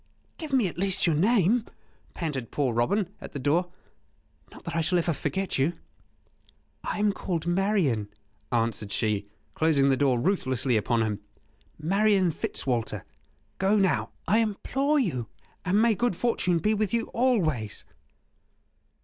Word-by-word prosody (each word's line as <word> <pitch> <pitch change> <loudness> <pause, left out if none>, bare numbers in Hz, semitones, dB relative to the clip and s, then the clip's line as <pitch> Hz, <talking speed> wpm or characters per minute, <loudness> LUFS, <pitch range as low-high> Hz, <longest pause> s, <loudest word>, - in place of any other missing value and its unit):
"Give 315 -3 -6
me 255 -7 +3
at 175 - -7
least 195 0 +1
your 165 -3 +3
name," 215 +5 +3 0.5
panted 140 -9 -3
poor 135 -5 0
Robin, 180 - +1
at - - -9
the - - -4
door; 165 +6 +1 0.8
"not - - -13
that 170 - -5
I 165 - +2
shall 180 +3 +1
ever 170 -1 +1
forget 155 +5 -2
you." 145 +6 +2 1.1
"I - - -3
am 205 -1 +2
called 170 -5 -3
Marian," 175 - +1 0.4
answered 115 -3 -1
she, 105 -1 -1 0.3
closing 150 -4 +3
the - - +4
door 130 -3 +2
ruthlessly 130 - +1
upon 115 +2 +1
him 105 -2 -2 0.6
"Marian 195 +2 +2
Fitzwalter.... 115 - -2 0.6
Go 195 +2 +3
now, 190 -3 +2 0.2
I 215 +5 +4
implore 270 +7 0
you, 150 - 0 0.4
and 190 +2 +2
may 230 0 +4
good 240 -1 0
fortune 185 -5 +1
be 210 +7 +1
with 215 0 0
you 230 - -1
always." 165 - 0
170 Hz, 145 wpm, -27 LUFS, 130-205 Hz, 1.1 s, the